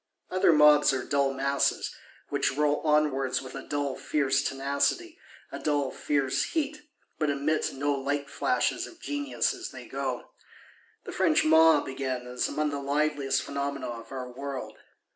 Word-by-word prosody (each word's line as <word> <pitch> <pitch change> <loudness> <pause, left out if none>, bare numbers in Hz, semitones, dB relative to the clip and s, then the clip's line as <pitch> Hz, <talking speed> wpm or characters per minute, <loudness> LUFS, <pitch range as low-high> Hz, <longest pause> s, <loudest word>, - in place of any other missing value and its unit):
Other 185 -2 +4
mobs 150 -2 +6
are 130 -2 -1
dull 140 -1 +1
masses; 140 +1 0 0.4
which 135 - 0
roll 150 0 +3
onwards 150 -4 +1
with 130 -1 -9
a - - -6
dull 145 -2 -2
fierce 140 -2 +1
tenacity, 140 - -1 0.3
a - - -6
dull 145 -3 0
fierce 140 -2 0
heat, 300 -1 -1 0.4
but 155 -2 +1
emit 145 +2 0
no 145 +2 0
light 140 +1 -2
flashes - - 0
of 345 - -15
genius 290 +6 -1
as 365 -2 -6
they - - -10
go. - - -4 0.7
The - - -7
French 315 -2 +2
mob, 160 -1 +6
again, 130 -2 -3
is 125 0 -2
among 150 -1 -1
the 145 - -3
liveliest 145 0 0
phenomena 140 -1 -3
of 115 -1 -8
our 130 -2 -5
world. 135 +1 -6
140 Hz, 155 wpm, -28 LUFS, 135-155 Hz, 0.7 s, mobs